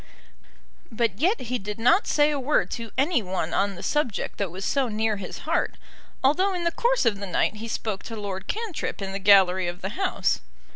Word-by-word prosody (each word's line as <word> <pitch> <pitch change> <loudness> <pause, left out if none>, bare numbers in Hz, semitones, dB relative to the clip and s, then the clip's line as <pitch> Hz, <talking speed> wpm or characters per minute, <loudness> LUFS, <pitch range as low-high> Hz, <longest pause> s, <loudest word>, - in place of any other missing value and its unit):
But 225 -3 -1
yet 375 - +2
he 250 0 -2
did 205 +1 -5
not 295 - +4
say 295 0 +3
a 290 - -1
word 275 +3 +1
to 230 -1 -5
any 280 0 +2
one 185 -4 -3
on 200 0 +1
the - - -9
subject 295 -9 -1
that 200 -3 0
was 190 +4 -6
so 275 -2 +1
near 220 -1 0
his 190 -2 -6
heart, 330 +3 0 0.5
although 370 +8 +3
in 350 - -2
the 340 - +1
course 485 - +1
of 210 -4 +2
the 200 - -5
night 185 +4 0
he 225 +2 -6
spoke 215 -3 -3
to 230 - -6
Lord 195 -3 -5
Cantrip 440 -6 -3
in 195 -1 -4
the 195 - -3
gallery 190 -2 +5
of 175 +1 -5
the 190 - -3
House. 380 - 0
225 Hz, 210 wpm, -25 LUFS, 195-295 Hz, 0.5 s, gallery